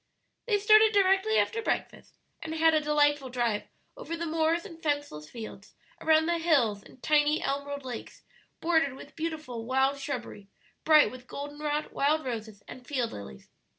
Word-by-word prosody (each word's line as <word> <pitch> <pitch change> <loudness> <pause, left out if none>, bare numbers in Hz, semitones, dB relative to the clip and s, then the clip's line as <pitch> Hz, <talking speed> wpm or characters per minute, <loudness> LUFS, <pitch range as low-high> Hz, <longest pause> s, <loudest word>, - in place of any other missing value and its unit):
They 420 -3 +3
started 430 +1 +6
directly 395 +2 +3
after 455 - +1
breakfast, - - -4 0.2
and 320 0 -5
had 320 0 +4
a 310 - +3
delightful 290 -2 +2
drive 235 -4 -1 0.3
over 420 -10 -6
the 335 - -3
moors 325 +2 0
and 330 -5 -11
fenceless 290 - -3
fields, 220 -3 -10 0.3
around 315 0 +4
the 340 0 0
hills 260 -12 +2
and 250 - -18
tiny 300 0 +3
emerald 280 0 -3
lakes 245 -3 -8 0.4
bordered 320 -5 +2
with 280 - -13
beautiful 310 -8 -4
wild 265 +3 +1
shrubbery, 250 -7 -6 0.4
bright 310 -1 +6
with 255 0 -12
golden 290 +1 -7
rod, 300 0 -2
wild 305 +2 +1
roses, 220 -4 -6
and 250 -1 -11
field 250 -5 -1
lilies. 70 -11 -10
290 Hz, 160 wpm, -28 LUFS, 255-325 Hz, 0.4 s, started